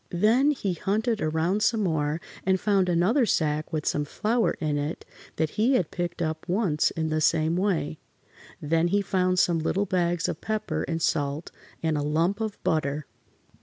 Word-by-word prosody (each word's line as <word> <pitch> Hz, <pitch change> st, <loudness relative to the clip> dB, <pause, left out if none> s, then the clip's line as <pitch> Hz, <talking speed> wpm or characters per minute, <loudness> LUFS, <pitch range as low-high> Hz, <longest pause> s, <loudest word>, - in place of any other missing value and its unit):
Then 225 Hz, +10 st, +3 dB
he 210 Hz, -10 st, -1 dB
hunted 215 Hz, +6 st, -1 dB
around 160 Hz, +6 st, 0 dB
some 215 Hz, 0 st, +2 dB
more 155 Hz, -3 st, 0 dB, 0.2 s
and 190 Hz, 0 st, +2 dB
found 195 Hz, -3 st, +2 dB
another 195 Hz, +9 st, +3 dB
sack 155 Hz, -3 st, 0 dB
with 155 Hz, -2 st, -2 dB
some 150 Hz, -, +1 dB
flour 220 Hz, +10 st, 0 dB
in 150 Hz, -4 st, 0 dB
it 145 Hz, +3 st, -4 dB, 0.3 s
that 160 Hz, -1 st, 0 dB
he 255 Hz, +4 st, +4 dB
had 180 Hz, -9 st, 0 dB
picked 175 Hz, -1 st, -3 dB
up 160 Hz, +2 st, -4 dB
once 180 Hz, -6 st, +2 dB
in 160 Hz, -1 st, -3 dB
the 155 Hz, 0 st, 0 dB
same 160 Hz, +1 st, +2 dB
way. 180 Hz, -, -1 dB, 0.6 s
Then 165 Hz, +3 st, +1 dB
he 200 Hz, +3 st, +1 dB
found 185 Hz, -1 st, +1 dB
some 175 Hz, -2 st, +3 dB
little 195 Hz, +5 st, 0 dB
bags 175 Hz, -2 st, 0 dB
of -, -, -4 dB
pepper 215 Hz, -1 st, -2 dB
and 165 Hz, -1 st, -2 dB
salt 145 Hz, 0 st, -1 dB, 0.3 s
and 160 Hz, -2 st, +1 dB
a -, -, -1 dB
lump 165 Hz, +8 st, 0 dB
of 215 Hz, -2 st, -3 dB
butter. 150 Hz, -2 st, 0 dB
175 Hz, 175 wpm, -26 LUFS, 155-200 Hz, 0.6 s, he